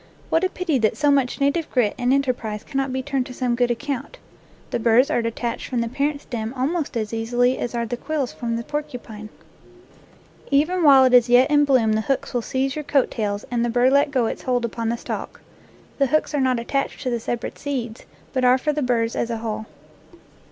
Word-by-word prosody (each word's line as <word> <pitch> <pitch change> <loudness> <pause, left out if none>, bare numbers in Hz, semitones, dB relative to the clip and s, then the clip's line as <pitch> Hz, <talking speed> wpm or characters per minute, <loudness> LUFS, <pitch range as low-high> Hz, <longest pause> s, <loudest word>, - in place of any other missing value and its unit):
What 325 - +3
a 375 - +2
pity 330 -8 -1
that 220 -2 +1
so 295 -1 +3
much 275 -3 +1
na 280 0 +3
tive 330 +1 -3
grit 235 -6 +1
and 245 0 0
enterprise 250 -6 -1
cannot 270 -2 -2
be 260 0 -2
turned 270 -2 -1
to 255 - -9
some 250 -2 0
good 245 0 +1
account! 280 - -4 0.5
The - - -1
burrs 235 +3 +4
are - - +2
detached 230 +1 -3
from 250 - -2
the - - 0
8 230 - -6
NATURE - - -15
LORE - - -16
parent 290 -1 -5
stem 230 -1 -4
almost 290 +1 -1
as 215 -1 -3
easily 245 +3 +1
as 240 - -3
are 235 0 -1
the 240 +2 -4
quills 295 -2 -3
from 230 -2 -3
the 230 - -3
porcupine. 235 -7 -6 1.2
Even 310 +6 +2
while 275 -3 +8
it 255 -1 +3
is 245 -1 +6
yet 250 +4 +5
in 290 0 +5
bloom 250 -6 +3
the 215 - +1
hooks 270 +4 -2
will 245 - 0
seize 265 +3 -1
your 305 - -4
coat 280 -2 +1
tails 205 -2 -3
and 235 -1 +1
the 240 - 0
burr 245 +2 +3
let 280 +1 +4
go 260 -4 +1
its - - -3
hold 245 -2 0
upon 230 0 -3
the 235 - -1
stalk. - - -6 0.6
The 275 - +4
hooks 310 +4 0
are 290 - +1
not 255 -2 +2
attached 275 +5 -2
to 255 - -1
the 235 - -1
separate 235 +1 -4
seeds, 250 -6 -4 0.3
but 260 -1 0
are 250 +1 +5
for 300 +3 -1
the 300 - -2
burrs 235 -3 0
as 235 - -1
a 230 - -2
whole. 220 -1 -4
250 Hz, 235 wpm, -22 LUFS, 235-275 Hz, 1.2 s, while